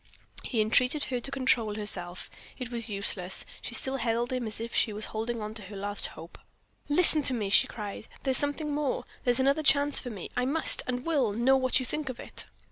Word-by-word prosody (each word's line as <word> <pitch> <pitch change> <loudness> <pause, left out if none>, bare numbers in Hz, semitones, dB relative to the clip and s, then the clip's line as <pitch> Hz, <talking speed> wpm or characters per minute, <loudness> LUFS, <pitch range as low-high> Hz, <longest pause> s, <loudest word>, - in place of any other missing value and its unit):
He 230 -4 -1
entreated 250 +7 +2
her 250 -2 -3
to 240 - -2
control 250 -6 +1
herself. 185 -4 -2 0.3
It 250 -2 -7
was 235 -1 -3
useless, 195 -2 0 0.2
she 235 - -4
still 265 +3 0
held 235 +1 -1
him 250 -3 -2
as 215 - -5
if 230 +1 -6
she 220 - +2
was 210 +1 -1
holding 220 -1 -4
to 220 - -8
her 200 +1 -10
last 205 +1 -2
hope. 165 +2 -11 0.5
"Listen 310 0 +6
to 260 -2 +5
me!" 205 -4 -3
she - - +5
cried. 210 -1 -7 0.2
"There's 265 -2 +3
something 290 +1 -2
more; 290 -2 -2 0.2
there's 245 0 +3
another 275 +3 +2
chance 285 -1 +3
for 250 - -6
me. 205 -6 -8
I 250 0 0
must, 310 +5 +3
and 250 +1 -3
will, 280 -10 +1
know 240 +5 +3
what 260 -1 +2
you 255 - -4
think 300 +1 -3
of 250 - -7
it." - - -5
245 Hz, 210 wpm, -28 LUFS, 215-270 Hz, 0.5 s, Listen